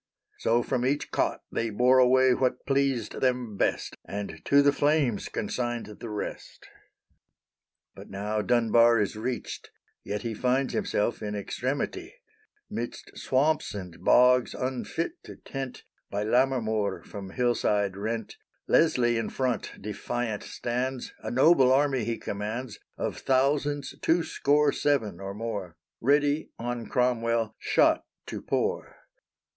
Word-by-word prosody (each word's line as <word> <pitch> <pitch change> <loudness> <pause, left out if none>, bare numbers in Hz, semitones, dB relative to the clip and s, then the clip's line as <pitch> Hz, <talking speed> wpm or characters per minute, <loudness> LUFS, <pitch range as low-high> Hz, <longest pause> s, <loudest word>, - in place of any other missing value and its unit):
So 120 +1 +2
from 125 -2 -1
each 140 +3 0
cot - - 0
They 115 - -1
bore 125 +4 +4
away 130 0 +5
what 130 0 0
pleased 135 -5 0
them 125 -4 0
best, - - -1
And 100 0 -6
to 140 0 +5
the 145 - +5
flames 145 -7 +1
consigned 120 +1 -2
the 115 - -6
rest. 105 -1 -6 1.3
But - - -12
now 105 +2 -2
Dunbar 115 +1 +4
is 105 -1 0
reached; 120 +3 -4 0.3
yet 105 0 -4
he 115 -1 -2
Finds 130 +4 0
himself 200 - 0
in 105 -1 -3
extremity; 145 - -3 0.5
Midst 120 +1 -6
swamps 145 -1 +1
and 90 -4 -8
bogs 125 0 +5
unfit 135 - -3
to - - -9
tent, 135 -2 -7 0.3
By 100 +1 -2
Lammermoor 110 -4 +1
from 100 -2 -8
hillside 105 -4 +1
rent, 110 +2 -4 0.3
Leslie 120 -7 +3
in 115 - -2
front 130 -2 -2
defiant 110 +2 -3
stands 125 +2 -3
A - - -4
noble 130 0 +5
army 135 -3 +2
he 115 0 -2
commands 110 +3 -5 0.2
Of - - -3
thousands 140 +1 +1
two 165 +1 +3
score 145 -1 +2
seven, 115 -14 0
or 100 0 -6
more, 100 -7 -5 0.2
Ready 145 +3 +2
on 120 0 -4
Cromwell 115 -3 +1
shot - - +3 0.2
to - - -6
pour. - - -2
120 Hz, 130 wpm, -27 LUFS, 110-135 Hz, 1.3 s, away